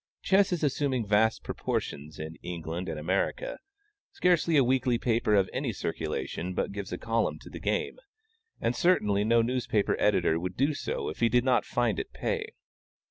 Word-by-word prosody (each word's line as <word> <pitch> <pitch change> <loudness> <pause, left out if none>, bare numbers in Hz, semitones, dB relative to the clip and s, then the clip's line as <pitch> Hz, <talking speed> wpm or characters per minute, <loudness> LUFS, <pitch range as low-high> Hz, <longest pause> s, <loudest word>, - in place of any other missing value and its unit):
Chess 195 0 +4
is 175 -3 -1
assuming 135 -4 0
vast 105 +2 +2
proportions 75 +2 -4
in 80 +1 -6
England 85 +1 -5
and 80 - -4
America: 95 - -1 0.5
scarcely 170 -3 +3
a 140 - +6
weekly 125 -1 +2
paper 115 -2 +1
of 95 -2 +4
any - - -1
circulation 90 +2 -3
but - - -1
gives 100 -1 -6
a 90 - -2
column 115 +3 0
to - - -13
the - - -7
game; - - -1 0.6
and - - 0
certainly 105 - +3
no 115 +2 +4
newspaper 115 -4 0
editor 80 - +3
would 90 +1 -5
do 140 +4 +2
so - - -3
if 75 - -8
he 115 - +3
did 120 0 +3
not 125 -2 +2
find 120 -5 0
it - - -5
pay. - - -2
115 Hz, 175 wpm, -29 LUFS, 95-130 Hz, 0.6 s, a